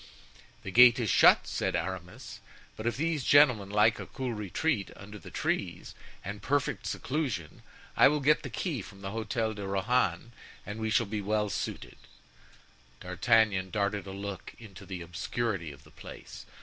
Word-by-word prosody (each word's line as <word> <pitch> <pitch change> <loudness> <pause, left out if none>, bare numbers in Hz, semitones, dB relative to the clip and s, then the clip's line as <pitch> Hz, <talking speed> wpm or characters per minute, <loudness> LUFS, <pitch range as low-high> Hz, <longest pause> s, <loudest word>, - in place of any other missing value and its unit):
"The 95 - -6
gate 120 +2 +7
is 110 -5 0
shut," - - +6
said - - -2
Aramis, 90 +1 -5 0.4
"but 110 - -4
if 120 - -1
these 160 -1 -1
gentlemen 125 -10 +5
like 105 +2 +3
a - - -7
cool 130 -3 -4
retreat 105 - -1
under 105 +1 -11
the - - -11
trees, - - -3 0.3
and 100 +2 -6
perfect 145 0 -1
seclusion, 130 - -3 0.3
I - - +7
will 150 +2 +1
get 150 +2 +3
the - - -6
key 155 - -3
from 100 -1 -13
the 95 0 -5
Hotel 110 0 -2
de 100 -2 -6
Rohan 100 +1 0 0.3
and 105 +1 -6
we 110 0 -2
shall 115 +2 +2
be 105 +1 -4
well 105 0 0
suited." - - -5 1.0
D'Artagnan 95 +1 +2
darted 100 -1 -1
a - - -6
look 100 0 -7
into 100 -5 -12
the 90 -3 -6
obscurity 85 +1 -3
of 70 - -15
the - - -19
Place. - - -11
105 Hz, 165 wpm, -29 LUFS, 95-120 Hz, 1.0 s, gate